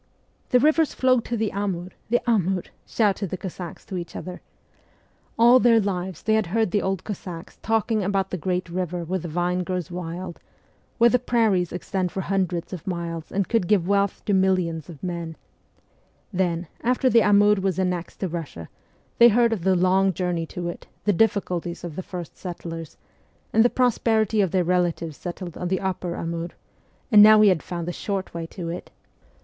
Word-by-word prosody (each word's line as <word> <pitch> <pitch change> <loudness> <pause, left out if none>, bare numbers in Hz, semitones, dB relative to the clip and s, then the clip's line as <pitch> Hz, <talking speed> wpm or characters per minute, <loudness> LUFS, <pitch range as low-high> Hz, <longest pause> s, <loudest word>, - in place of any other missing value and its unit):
' - - -40
The 250 - +5
rivers 310 +2 +3
flow 255 -1 +3
to 235 +1 -4
the 220 -1 -1
Amur, 190 -3 -2 0.2
the 240 +1 +1
Amur! 190 -5 +1 0.2
' - - -39
shouted 205 -3 +2
the 185 - -4
Cossacks 180 -2 -8
to 190 - -5
each 175 -1 -7
other. 180 -1 -7 1.0
All 240 +2 +7
their 235 -2 +5
lives 190 -4 -3
they 220 - +2
had 220 -4 +2
heard 220 +1 0
the 205 - +1
old 190 -1 -2
Cossacks 180 -4 -7
talking 225 -1 +1
about 195 0 0
the - - -1
great 180 +2 -2
river 175 0 -3
where 185 +3 -2
the 170 - -6
vine 175 +2 -1
grows 180 0 -3
wild, 175 0 -6 0.6
where 235 0 +5
the 250 - +3
prairies 220 -8 +1
extend 180 0 -2
for 190 - -3
hundreds 185 -2 -2
of 175 -1 -8
miles 170 -3 -4
and 195 -1 0
could 225 -7 +1
give 195 -5 +2
wealth 200 0 +1
to 205 - +1
millions 185 -5 +1
of 155 -5 -11
men; 170 -3 -4 1.0
then, 175 -2 0 0.2
after 250 +2 +1
the 235 -2 +5
Amur 205 -1 +4
was 190 -2 0
annexed 180 -2 -2
to 190 - -1
Kussia, 155 - -6 0.5
they 235 0 +9
heard 235 +1 +3
of 210 - -3
the 190 0 +3
long 190 +2 +3
journey 175 -2 -2
to 175 +1 -5
it, 175 - -7 0.2
the 205 - +2
difficulties 180 -4 0
of 170 -4 -6
the 185 - -3
first 175 -2 -8
settlers, 165 -3 -7 0.6
and 225 - +6
the 245 - +4
prosperity 225 -4 +2
of 190 - +2
their 185 +1 +1
relatives 175 -3 0
settled 175 0 -7
on 180 - -2
the 185 0 0
upper 185 -2 -3
Amur; 165 +1 -4 0.6
and 210 -2 +9
now 215 +1 +9
we 210 -1 +7
had 180 -5 +2
found 170 -1 -5
the 175 - -2
short 195 -1 -4
way 165 -1 -5
to 175 0 -7
it 175 +2 -6
185 Hz, 190 wpm, -24 LUFS, 175-210 Hz, 1.0 s, they